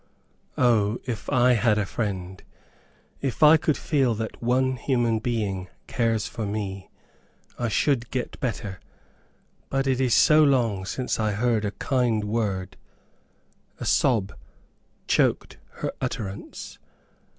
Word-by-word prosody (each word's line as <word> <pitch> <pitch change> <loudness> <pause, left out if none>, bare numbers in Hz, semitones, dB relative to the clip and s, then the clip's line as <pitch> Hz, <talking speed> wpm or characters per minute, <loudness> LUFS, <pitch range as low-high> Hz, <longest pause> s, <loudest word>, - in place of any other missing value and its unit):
O, 115 -3 +3
if 115 -4 -4
I 125 0 +4
HAD 110 -2 +3
A 105 - +1
FRIEND, 95 -3 -4 0.8
if 135 +1 -1
I 150 +1 +9
could 155 -2 +1
feel 135 -7 +1
that 110 +1 -5
one 130 +2 +1
human 120 -3 +1
being 105 -5 -2 0.2
cares 115 -3 0
for 110 +1 -5
me, 100 -2 -4 0.7
I 120 - 0
should 120 +1 +1
get 125 -2 -4
better. 105 -6 -4 0.9
But 135 0 0
it 130 -1 +1
is 125 -3 +3
so 155 0 +6
long 115 -9 +2
since 125 +4 -2
I 110 -1 +1
heard 110 0 +1
a 100 - -1
kind 120 -3 0
word 100 -3 -2 0.5
" - - -39
a - - -5
sob 110 -7 +2 0.7
choked - - +1 0.2
her - - -3
utterance. 100 -2 -5
115 Hz, 130 wpm, -25 LUFS, 105-125 Hz, 0.9 s, I